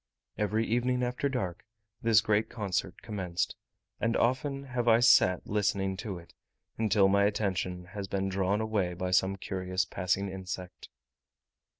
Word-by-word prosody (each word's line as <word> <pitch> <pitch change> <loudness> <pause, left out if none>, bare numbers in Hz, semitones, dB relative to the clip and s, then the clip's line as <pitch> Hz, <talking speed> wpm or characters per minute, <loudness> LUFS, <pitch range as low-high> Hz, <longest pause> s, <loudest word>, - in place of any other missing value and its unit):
Every 105 +2 0
evening 125 +2 +1
after 125 +3 -1
dark 95 -10 -3 0.4
this 115 -2 +5
great 110 +1 +1
concert 95 -4 -3
commenced; 95 -6 -2 0.4
and 115 0 +1
often 135 +3 0
have 130 -3 -3
I 115 0 +6
sat 90 -6 +5
listening 100 -2 0
to 100 -2 -5
it, 85 0 -14 0.4
until 105 -3 +3
my 100 +1 +4
attention 95 -3 -1
has 95 +2 -6
been 95 0 -1
drawn 95 +2 0
away 105 -5 -1
by 90 +1 -3
some 95 +1 +3
curious 95 -1 -2
passing 95 +2 -1
insect. 95 -1 -7
100 Hz, 140 wpm, -30 LUFS, 95-115 Hz, 0.4 s, I